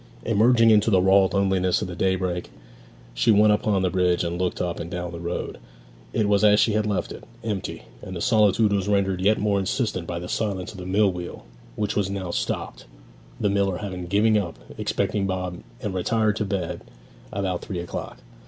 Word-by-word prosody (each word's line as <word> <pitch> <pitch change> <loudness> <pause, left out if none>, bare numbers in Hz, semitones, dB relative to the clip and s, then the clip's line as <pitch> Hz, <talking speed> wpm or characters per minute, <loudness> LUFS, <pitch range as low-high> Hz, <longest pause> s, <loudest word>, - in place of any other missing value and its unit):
Emerging 115 +1 +5
into 105 +1 +4
the 95 -4 +4
raw 95 +1 +5
loneliness 95 +2 +1
of - - -3
the 90 - -6
daybreak, 95 -2 -1 0.6
she - - +1
went 105 0 +6
upon 105 -2 +1
the 90 - +2
bridge 90 -2 +2
and 85 +1 -2
looked 90 - -1
up 90 -1 -2
and 85 - -5
down 90 0 -4
the 85 - -7
road. 85 +1 -4 0.5
It 105 - +1
was 100 0 +3
as 105 0 +6
she 115 - +4
had 105 0 +1
left 105 -2 -1
it, - - -9 0.2
empty, 105 -4 -4 0.2
and 95 - -7
the - - -4
solitude 105 -2 +3
was 100 -1 0
rendered 95 -2 +1
yet 105 +3 +3
more 100 -1 +1
insistent 100 -3 -2
by 85 - -3
the 85 +1 -5
silence 95 -3 -2
of 100 - -11
the 90 - -7
mill 100 +1 +3
wheel, 90 -1 -7 0.3
which 105 -1 -2
was 100 -2 0
now 95 -3 -4
stopped, - - -3 0.5
the - - +1
miller 100 -2 +1
having 90 -3 -5
given 105 +4 +3
up 85 -5 -5 0.2
expecting 100 -2 -1
Bob 90 -2 -3 0.2
and 105 -4 -2
retired 105 +3 +1
to 105 - -1
bed 95 -4 -3 0.5
about 95 -3 -2
three 95 - -5
o'clock. 85 0 -5
95 Hz, 200 wpm, -24 LUFS, 90-105 Hz, 0.6 s, went